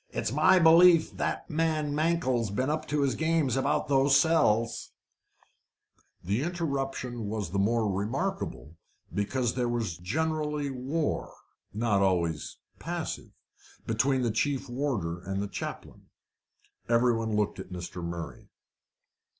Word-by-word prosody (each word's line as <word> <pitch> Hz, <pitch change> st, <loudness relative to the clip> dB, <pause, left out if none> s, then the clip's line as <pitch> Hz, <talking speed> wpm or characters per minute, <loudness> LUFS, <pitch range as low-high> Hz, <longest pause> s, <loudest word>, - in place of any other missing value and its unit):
"It's -, -, -2 dB
my 155 Hz, +7 st, +5 dB
belief 165 Hz, 0 st, +6 dB
that -, -, -2 dB
man 155 Hz, -2 st, 0 dB
Mankell's 150 Hz, -, +1 dB
been 130 Hz, +8 st, -1 dB
up 155 Hz, 0 st, -3 dB
to 150 Hz, 0 st, 0 dB
his 140 Hz, -2 st, +2 dB
games 160 Hz, -5 st, +1 dB
about 135 Hz, -, 0 dB
those 140 Hz, 0 st, +4 dB
cells." 115 Hz, -8 st, +2 dB, 1.3 s
The 100 Hz, +7 st, 0 dB
interruption 135 Hz, -8 st, -3 dB
was 105 Hz, -5 st, -3 dB
the 100 Hz, -, 0 dB
more 110 Hz, +2 st, +2 dB
remarkable, 105 Hz, -, -3 dB, 0.4 s
because 115 Hz, +3 st, 0 dB
there 125 Hz, -2 st, -1 dB
was 115 Hz, -8 st, -2 dB
generally 150 Hz, -, -1 dB
war 135 Hz, +5 st, -2 dB, 0.4 s
not 105 Hz, -1 st, +1 dB
always 85 Hz, -5 st, 0 dB, 0.2 s
passive -, -, -4 dB, 0.6 s
between 130 Hz, +4 st, +1 dB
the 120 Hz, -, +1 dB
chief 140 Hz, +4 st, -1 dB
warder 120 Hz, -10 st, -2 dB
and 95 Hz, +2 st, -4 dB
the 100 Hz, -, -2 dB
chaplain. 100 Hz, -, -7 dB, 0.8 s
Every 120 Hz, +1 st, +4 dB
one 110 Hz, -1 st, -1 dB
looked 105 Hz, -1 st, 0 dB
at -, -, -8 dB
Mr. 90 Hz, 0 st, -6 dB
Murray. 85 Hz, 0 st, -6 dB
125 Hz, 125 wpm, -28 LUFS, 105-150 Hz, 1.3 s, belief